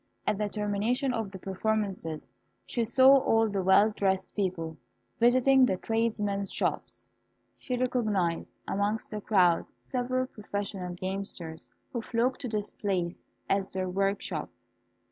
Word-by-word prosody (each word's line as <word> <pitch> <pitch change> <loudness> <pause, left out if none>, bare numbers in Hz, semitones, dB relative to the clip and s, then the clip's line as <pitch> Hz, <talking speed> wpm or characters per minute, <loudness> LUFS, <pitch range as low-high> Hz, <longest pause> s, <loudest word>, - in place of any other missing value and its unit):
At 210 - 0
the 210 -1 0
termination 215 +6 0
of 225 -4 -2
the 190 - -8
performances, 190 -4 -2 0.4
she 235 - -1
saw 260 +4 +7
all 225 -3 +3
the 200 -2 -1
well 190 +3 +5
dressed 190 -2 0
people 175 -5 -2 0.4
visiting 255 +3 +5
the 190 -7 +3
tradesmen's 210 -3 -1
shops. - - -2 0.5
She 250 -1 -3
recognised 215 -9 0
amongst 205 +2 -1
the 210 -1 -4
crowd 180 -5 +3
several 255 0 -1
professional 200 -5 -5
gamesters, 185 -3 -5 0.2
who 235 - -1
flocked 245 +3 0
to 260 - -3
this 210 -2 -3
place 180 -4 -2 0.2
as 195 -1 +1
their 185 0 -2
workshop. 195 +2 -1
205 Hz, 130 wpm, -29 LUFS, 190-230 Hz, 0.5 s, saw